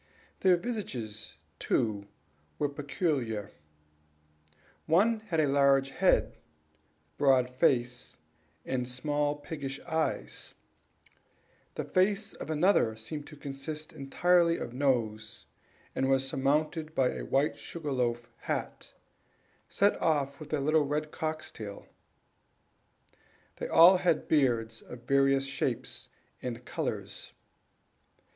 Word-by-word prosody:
Their 185 -2 +5
visages, 130 - -5 0.2
too, 100 -2 0 0.5
were 145 - 0
peculiar; 140 - -2 1.4
one 210 +8 +4
had 165 -6 0
a 155 - +4
large 135 -1 +3
beard, - - +3 0.8
broad 130 -3 +4
face, 125 -1 +1 0.5
and 125 -1 -2
small 145 +3 0
piggish 145 -2 -6
eyes; 160 -1 -3 1.2
the - - -2
face 200 +3 +1
of - - -8
another 155 - +3
seemed 145 +7 -6
to 150 - -11
consist 145 +2 -6
entirely 170 +4 +3
of 120 - -5
nose, 115 -5 -1 0.5
and 135 - 0
was 135 0 +2
surmounted 155 +4 0
by 130 -1 +3
a - - -5
white 140 +3 +1
sugar 160 -4 -5
loaf 120 -2 0 0.2
hat, - - -4 0.7
set 200 +1 +2
off 140 -4 +1
with 155 -1 -10
a 155 - +1
little 155 +3 +3
red 150 +1 -2
cock's 155 0 -4
tail. 105 -2 -8 1.7
They - - -4
all 175 +3 +8
had 175 -3 +1
beards, 120 -7 +1
of 120 -1 -11
various 135 +1 +3
shapes 135 -1 -3 0.3
and 125 -1 -5
colors. - - -4
140 Hz, 110 wpm, -30 LUFS, 125-155 Hz, 1.7 s, all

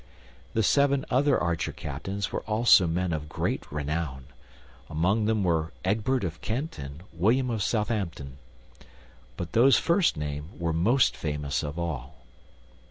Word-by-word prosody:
The 110 - +3
seven 140 +4 +3
other 135 +2 +3
archer 85 -1 -1
captains 95 +8 -4
were - - -2
also 105 -4 +5
men 85 +1 -1
of 75 -1 -4
great - - -3
renown; 75 -2 -3 0.6
among 95 +8 +1
them 110 -2 +1
were 80 -2 0
Egbert 110 +6 +1
of 85 -1 -4
Kent 130 - -3
and 70 +4 -8
William 120 +9 +2
of 110 -2 -2
Southampton; 95 - -2 1.0
but 85 -1 -5
those 120 0 +6
first 170 - +2
named 75 +3 -5
were 85 -1 0
most 115 +11 +3
famous 75 -2 -2
of 75 +1 -5
all. 80 -5 -4
90 Hz, 140 wpm, -27 LUFS, 75-115 Hz, 1.0 s, those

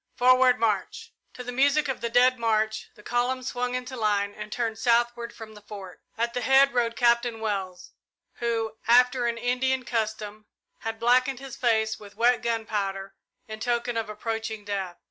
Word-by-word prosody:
Forward 255 0 +5
march!" 230 - -1 0.2
To 250 - -7
the 245 - -5
music 285 +4 +2
of 265 - -3
the 235 - -1
Dead 250 +1 +4
March 220 -1 0
the 210 - -17
column 245 +3 -1
swung 250 0 -2
into 255 +1 -5
line 205 -3 0
and 210 - -8
turned 225 -2 -2
southward 235 0 +1
from 220 -2 -11
the 210 - -13
Fort. 200 -3 -10 0.2
At 235 +1 -1
the 245 - -2
head 270 +2 +5
rode 235 -2 +1
Captain 235 0 +2
Wells, 195 -4 -4 0.5
who, 225 -2 -2
after 245 +1 +4
an 235 0 -1
Indian 255 +2 0
custom, 215 -2 -3 0.3
had 225 0 -4
blackened 255 +2 +3
his 270 -2 -8
face 220 -3 +1
with 205 -1 -13
wet 240 0 +3
gunpowder 210 -4 -2 0.3
in 220 0 -7
token 240 +1 -1
of 225 -1 -2
approaching 220 0 -4
death. 195 -3 -4
235 Hz, 170 wpm, -26 LUFS, 220-250 Hz, 0.5 s, Forward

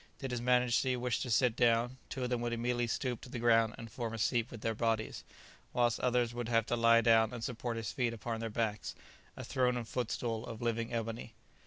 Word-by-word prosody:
Did 135 -2 -5
his 120 -1 -2
Majesty 125 +1 +3
wish 125 -2 -1
to 125 - -3
sit 120 0 +3
down, 120 +1 +2
two 130 - -4
of 125 - -2
them 120 -1 0
would 120 0 -1
immediately 120 +1 0
stoop 120 +1 -2
to - - -10
the 125 - -5
ground 115 -1 +3
and 115 -1 -9
form 115 -1 -4
a - - -5
seat 115 +1 +1
with 115 - -9
their 115 - 0
bodies, 110 -1 -1 0.5
whilst 120 -3 +2
others 125 -1 +1
would 120 -1 -4
have 115 -2 +3
to 120 - 0
lie 115 0 +5
down 115 -1 +4
and 120 -2 -6
support 120 -1 -3
his 115 -2 -3
feet 125 -3 0
upon 115 0 -4
their 115 0 -3
backs: 105 -1 -2 0.4
a - - -6
throne 125 -1 +1
and 115 -2 -4
footstool 115 -1 -2
of 115 -2 -7
living 115 -1 -1
ebony. 115 -1 -4
115 Hz, 225 wpm, -33 LUFS, 115-125 Hz, 0.5 s, lie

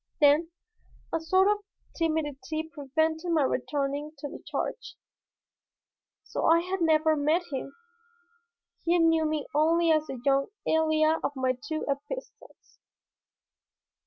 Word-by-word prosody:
Then 300 +3 +5 0.6
a 330 - +1
sort 375 +4 +3
of 415 0 +2 0.4
timidity 315 -1 -2
prevented 315 +3 -1
my 315 -3 +3
returning 285 +3 -2
to 290 - -5
the - - -10
charge. - - -4 1.3
So - - -3
I 330 +1 +5
had 370 +1 -3
never 315 -1 +3
met 305 +4 +1
him. 275 0 -5 1.1
He 345 +1 +3
knew 325 -1 +3
me 305 -2 -2
only 330 +3 +3
as 310 -1 +2
the 265 - -6
young 275 0 +3 0.2
Elia 315 0 +2
of 290 - -2
my 260 -1 +1
two 290 +5 -5
epistles. 290 - -7
310 Hz, 125 wpm, -28 LUFS, 285-330 Hz, 1.3 s, Then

